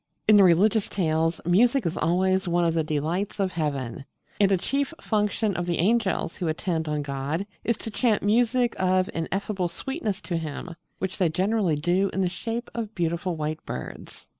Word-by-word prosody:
In 215 Hz, -, +7 dB
the 200 Hz, -, +7 dB
religious 200 Hz, +5 st, +4 dB
tales 165 Hz, -2 st, 0 dB
music 235 Hz, +8 st, +3 dB
is 170 Hz, +1 st, -1 dB
always 185 Hz, +3 st, +1 dB
one 175 Hz, 0 st, +2 dB
of 165 Hz, -, +2 dB
the 165 Hz, -1 st, +1 dB
delights 160 Hz, +8 st, -2 dB
of 190 Hz, -2 st, +1 dB
heaven; 140 Hz, -7 st, -3 dB, 0.3 s
and 200 Hz, -1 st, +4 dB
a 190 Hz, -, +4 dB
chief 275 Hz, -, -1 dB
function 210 Hz, -1 st, 0 dB
of 175 Hz, +1 st, -2 dB
the 170 Hz, -, 0 dB
angels 195 Hz, -2 st, +1 dB
who 175 Hz, -, -2 dB
attend 160 Hz, 0 st, -1 dB
on 150 Hz, -1 st, -1 dB
God 140 Hz, +6 st, -3 dB, 0.2 s
is 235 Hz, -1 st, 0 dB
to 225 Hz, -, -7 dB
chant 220 Hz, -2 st, +1 dB
music 240 Hz, +3 st, +2 dB
of 185 Hz, 0 st, +2 dB
ineffable 190 Hz, +2 st, -2 dB
sweetness 215 Hz, -, -4 dB
to 175 Hz, -, -2 dB
Him, 160 Hz, +2 st, -5 dB, 0.2 s
which 190 Hz, +2 st, -4 dB
they 180 Hz, -3 st, +3 dB
generally 190 Hz, 0 st, +1 dB
do 175 Hz, +6 st, +1 dB
in 195 Hz, -, 0 dB
the 185 Hz, -, +2 dB
shape 230 Hz, +6 st, -4 dB
of 225 Hz, -2 st, -5 dB
beautiful 170 Hz, +1 st, -1 dB
white 155 Hz, 0 st, -3 dB
birds. -, -, -8 dB
185 Hz, 185 wpm, -26 LUFS, 165-210 Hz, 0.3 s, In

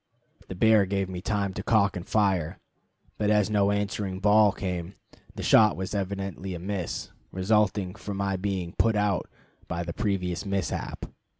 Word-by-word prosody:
The 95 Hz, -, -6 dB
bear 110 Hz, 0 st, +4 dB
gave 95 Hz, -1 st, -1 dB
me 90 Hz, -1 st, -5 dB
time 100 Hz, -2 st, -1 dB
to -, -, -4 dB
cock 105 Hz, -4 st, +2 dB
and 90 Hz, 0 st, -6 dB
fire, 95 Hz, -7 st, +1 dB, 0.6 s
but 105 Hz, -1 st, +1 dB
as 105 Hz, 0 st, +3 dB
no 100 Hz, -1 st, +3 dB
answering 100 Hz, -2 st, -2 dB
"bawl" 105 Hz, +1 st, +5 dB
came, 90 Hz, -1 st, -4 dB, 0.4 s
the -, -, -5 dB
shot 105 Hz, -1 st, +5 dB
was 95 Hz, +1 st, -4 dB
evidently 95 Hz, -1 st, -3 dB
a -, -, -6 dB
miss, 95 Hz, -1 st, -4 dB, 0.2 s
resulting 100 Hz, -1 st, +1 dB
from 100 Hz, 0 st, -6 dB
my 100 Hz, -1 st, 0 dB
being 95 Hz, -2 st, -3 dB
"put 115 Hz, -1 st, +3 dB
out" 105 Hz, -3 st, 0 dB, 0.4 s
by 85 Hz, +1 st, -3 dB
the 85 Hz, 0 st, -5 dB
previous 95 Hz, -5 st, -1 dB
mishap. 100 Hz, -5 st, -3 dB
100 Hz, 165 wpm, -27 LUFS, 95-105 Hz, 0.6 s, bawl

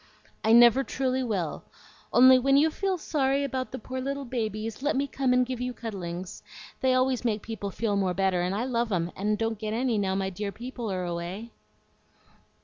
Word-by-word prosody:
"I 220 Hz, -, +3 dB
never 240 Hz, +3 st, +7 dB
truly 260 Hz, -1 st, -1 dB
will! 195 Hz, -10 st, -2 dB, 0.5 s
Only 255 Hz, +1 st, +7 dB
when 275 Hz, +2 st, +3 dB
you 310 Hz, +3 st, +4 dB
feel 385 Hz, +2 st, -1 dB
sorry 280 Hz, -4 st, 0 dB
about 260 Hz, -2 st, -3 dB
the 260 Hz, -, -5 dB
poor 260 Hz, +3 st, -5 dB
little 275 Hz, +1 st, -3 dB
babies, 220 Hz, -2 st, -3 dB
let 290 Hz, +1 st, 0 dB
me 275 Hz, +2 st, +1 dB
come 270 Hz, -2 st, -1 dB
and 250 Hz, 0 st, +4 dB
give 250 Hz, -1 st, -5 dB
you 250 Hz, 0 st, -2 dB
cuddlings. 185 Hz, -5 st, -6 dB, 0.4 s
They 260 Hz, -1 st, +2 dB
always 255 Hz, -1 st, +1 dB
make 215 Hz, -3 st, -1 dB
people 220 Hz, -3 st, -5 dB
feel 205 Hz, +1 st, -1 dB
more 190 Hz, -2 st, 0 dB
better, 190 Hz, -1 st, +1 dB
and 180 Hz, +2 st, -1 dB
I 220 Hz, -, -1 dB
love 240 Hz, -3 st, -1 dB
'em, 175 Hz, -2 st, 0 dB
and 210 Hz, +2 st, 0 dB
don't 225 Hz, -1 st, -2 dB
get 215 Hz, -1 st, -3 dB
any 240 Hz, -2 st, +1 dB
now 190 Hz, -1 st, 0 dB
my 190 Hz, 0 st, -1 dB
dear 200 Hz, +2 st, -4 dB
people 235 Hz, +1 st, -6 dB
are 185 Hz, -1 st, -2 dB
away." 175 Hz, +6 st, -5 dB
230 Hz, 200 wpm, -27 LUFS, 200-260 Hz, 0.5 s, never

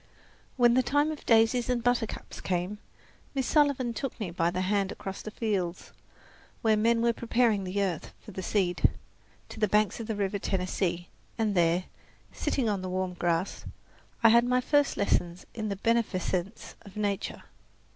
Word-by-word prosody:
When 240 Hz, -1 st, +5 dB
the 255 Hz, -, +4 dB
time 290 Hz, +4 st, +1 dB
of 305 Hz, -, -9 dB
daisies 230 Hz, +2 st, +4 dB
and 245 Hz, -2 st, 0 dB
buttercups 245 Hz, -2 st, -1 dB
came 185 Hz, +3 st, -2 dB, 0.6 s
Miss 265 Hz, -2 st, 0 dB
Sullivan 280 Hz, -5 st, +2 dB
took 260 Hz, +3 st, -4 dB
me 200 Hz, -6 st, -3 dB
by 170 Hz, -1 st, +1 dB
the 180 Hz, +1 st, -2 dB
hand 195 Hz, 0 st, +1 dB
across 195 Hz, 0 st, -6 dB
the -, -, -6 dB
fields, 195 Hz, -6 st, -2 dB, 0.7 s
where 220 Hz, -1 st, +4 dB
men 230 Hz, +2 st, +2 dB
were 235 Hz, 0 st, +3 dB
preparing 230 Hz, -4 st, +1 dB
the 200 Hz, +2 st, 0 dB
earth 180 Hz, -5 st, -3 dB
for 215 Hz, -, -12 dB
the 190 Hz, -, -5 dB
seed, 185 Hz, -2 st, +2 dB, 0.6 s
to -, -, -9 dB
the 210 Hz, -, +3 dB
banks 210 Hz, +3 st, +2 dB
of 225 Hz, -, -5 dB
the 205 Hz, -2 st, -1 dB
Tennessee 185 Hz, 0 st, 0 dB
River, 175 Hz, 0 st, -12 dB, 0.3 s
and 220 Hz, -3 st, +1 dB
there, 170 Hz, +1 st, +3 dB, 0.5 s
sitting 260 Hz, -5 st, -1 dB
on 205 Hz, -3 st, 0 dB
the 185 Hz, -, -4 dB
warm 185 Hz, 0 st, -2 dB
grass, 175 Hz, +1 st, -1 dB, 0.6 s
I 230 Hz, -, +9 dB
had 235 Hz, +1 st, +6 dB
my 250 Hz, +1 st, +2 dB
first 290 Hz, +2 st, +2 dB
lessons 175 Hz, -3 st, 0 dB
in 215 Hz, -2 st, -3 dB
the 200 Hz, -, -2 dB
beneficence 200 Hz, -3 st, -1 dB
of 200 Hz, -1 st, -13 dB
nature. 205 Hz, -1 st, -2 dB
210 Hz, 170 wpm, -28 LUFS, 185-235 Hz, 0.7 s, I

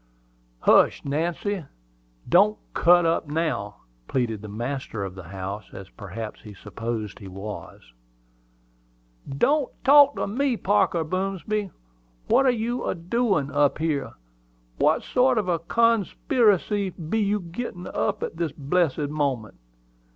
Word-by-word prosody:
"Hush, -, -, +4 dB
Nancy! 170 Hz, +6 st, -2 dB, 0.6 s
Don't 205 Hz, +4 st, +4 dB, 0.2 s
cut 175 Hz, 0 st, +5 dB
up 165 Hz, -1 st, +1 dB
now!" 150 Hz, -10 st, -2 dB, 0.3 s
pleaded 115 Hz, -5 st, -1 dB
the 110 Hz, -, -8 dB
master 120 Hz, 0 st, -4 dB
of 95 Hz, -1 st, -5 dB
the 95 Hz, -2 st, -10 dB
house, 95 Hz, +3 st, -6 dB
as 95 Hz, -1 st, -10 dB
perhaps 105 Hz, +1 st, -7 dB
he 105 Hz, -2 st, -11 dB
supposed 110 Hz, +1 st, -5 dB
he 100 Hz, -, -10 dB
was. 95 Hz, -, -9 dB, 1.4 s
"Don't 265 Hz, -, +1 dB
talk 285 Hz, 0 st, +7 dB
to -, -, -1 dB
me, 250 Hz, +4 st, 0 dB
Parker 190 Hz, -5 st, +2 dB
Boomsby! 195 Hz, +4 st, -2 dB, 0.6 s
What 270 Hz, -, +4 dB
are -, -, +6 dB
you 240 Hz, +1 st, -1 dB
a -, -, -1 dB
doin' 180 Hz, -, 0 dB
up 145 Hz, 0 st, +2 dB
here? 155 Hz, -3 st, -2 dB, 0.7 s
What -, -, +3 dB
sort 255 Hz, 0 st, +2 dB
of 210 Hz, -4 st, 0 dB
a 170 Hz, -2 st, +1 dB
con 230 Hz, +5 st, +3 dB
spy 270 Hz, -, -5 dB
racy 205 Hz, -2 st, +3 dB
be 175 Hz, +4 st, -3 dB
you 210 Hz, 0 st, +1 dB
gittin' 180 Hz, -3 st, -5 dB
up -, -, -2 dB
at -, -, -5 dB
this 165 Hz, -4 st, -2 dB
blessed 150 Hz, 0 st, 0 dB
moment? 140 Hz, -8 st, -2 dB
165 Hz, 135 wpm, -25 LUFS, -, 1.4 s, talk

